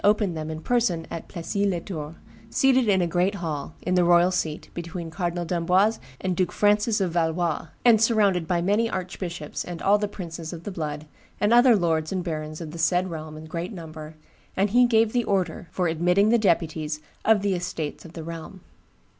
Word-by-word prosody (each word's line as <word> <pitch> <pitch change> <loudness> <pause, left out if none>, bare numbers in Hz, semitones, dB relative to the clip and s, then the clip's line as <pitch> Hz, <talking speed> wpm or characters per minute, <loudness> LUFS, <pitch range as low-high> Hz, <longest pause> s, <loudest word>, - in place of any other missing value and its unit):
opened 205 -3 +3
them 155 0 -4
in 155 0 -4
person 190 -5 0
at 165 - -6
Plessis 200 +3 -2
les 180 -3 0
Tours, 160 -4 -6 0.3
seated 260 -3 +3
in 190 -2 +4
a - - +2
great 180 +4 +1
hall, 160 -5 -4
in 180 - 0
the 180 -1 +4
royal 175 +1 +5
seat, 160 -4 -2
between 170 -1 -6
Cardinal 175 0 -2
d'Amboise 180 +6 +2 0.2
and 185 -1 -1
Duke 180 0 0
Francis 210 +1 +2
of 185 -3 0
Valois, 165 -1 0 0.2
and 225 -3 +6
surrounded 205 -7 +3
by 175 -1 +1
many 210 +5 +2
archbishops 180 -4 -5
and 175 -2 -7
all 205 +3 +3
the 210 - 0
princes 170 -5 -7
of 170 -1 -8
the 205 - -5
blood 150 -4 -4 0.3
and 210 +2 +3
other 240 0 +7
lords 160 -4 0
and 185 -2 -1
barons 155 -2 -4
of 160 -2 -6
the 170 - -8
said 180 +2 +2
realm 155 -1 -7
in 155 - -9
great 170 +3 -4
number, 155 -3 -9 0.4
and 195 +1 +2
he 245 +2 +5
gave 225 -2 +3
the 245 -1 +2
order 180 -4 -1
for 180 -2 -1
admitting 180 +5 +3
the 235 +1 +4
deputies 160 -5 0 0.2
of 215 -3 +4
the 200 -1 +1
estates 175 -4 -4
of 165 - -12
the 165 - -7
realm. 165 +3 -8
175 Hz, 200 wpm, -25 LUFS, 165-200 Hz, 0.4 s, other